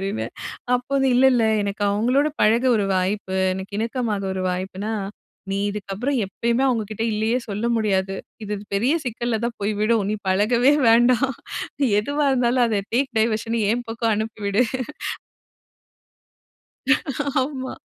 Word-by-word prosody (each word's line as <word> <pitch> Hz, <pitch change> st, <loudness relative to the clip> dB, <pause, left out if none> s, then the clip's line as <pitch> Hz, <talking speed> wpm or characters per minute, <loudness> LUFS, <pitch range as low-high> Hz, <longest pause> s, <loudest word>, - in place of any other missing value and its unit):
அப்டினு. 195 Hz, +3 st, -2 dB, 0.5 s
அப்போது 270 Hz, +2 st, -1 dB
இல்ல 255 Hz, +2 st, +4 dB
இல்ல 235 Hz, -2 st, +3 dB, 0.2 s
எனக்கு 200 Hz, +1 st, -3 dB
அவங்களோடு 250 Hz, +8 st, +2 dB
பழக 230 Hz, +4 st, +4 dB
ஒரு 205 Hz, -, +1 dB
வாய்ப்பு 190 Hz, +1 st, -1 dB, 0.2 s
எனக்கு 190 Hz, +2 st, -7 dB
இணக்கமா 230 Hz, -1 st, -1 dB, 0.2 s
ஒரு 190 Hz, -1 st, -3 dB
வாய்ப்புனா, 190 Hz, +4 st, -4 dB, 0.6 s
நீ 195 Hz, -, -1 dB
இதுக்கு 200 Hz, -1 st, -6 dB
அப்புறம் 260 Hz, +8 st, -1 dB
எப்பையுமே 235 Hz, +6 st, 0 dB
அவங்ககிட்ட 220 Hz, -3 st, -2 dB
இல்லயே 220 Hz, +4 st, +1 dB
சொல்ல 210 Hz, +3 st, -2 dB
முடியாது. 195 Hz, -3 st, 0 dB, 0.3 s
இது 210 Hz, 0 st, -3 dB, 0.2 s
பெரிய 245 Hz, +9 st, +2 dB
சிக்கல்ல 235 Hz, -1 st, -2 dB
தான் 235 Hz, -1 st, -3 dB
போய் 205 Hz, +2 st, 0 dB
விடும். 215 Hz, -1 st, +2 dB
நீ 215 Hz, -, -1 dB
பழகவே 235 Hz, +8 st, +4 dB, 0.2 s
வேண்டாம். 245 Hz, +3 st, +4 dB, 0.7 s
எதுவா 285 Hz, +6 st, -1 dB
இருந்தாலும் 245 Hz, 0 st, +3 dB
அத 210 Hz, -3 st, 0 dB
டேக் 265 Hz, +2 st, +1 dB
டைவர்ஷன் 225 Hz, +1 st, 0 dB
என் 240 Hz, +1 st, -2 dB
பக்கம் 225 Hz, 0 st, 0 dB
அனுப்பி 220 Hz, +1 st, -4 dB
விடு. 200 Hz, +5 st, +3 dB, 2.8 s
ஆமா. 260 Hz, -1 st, -4 dB
225 Hz, 135 wpm, -22 LUFS, 205-245 Hz, 2.8 s, இல்ல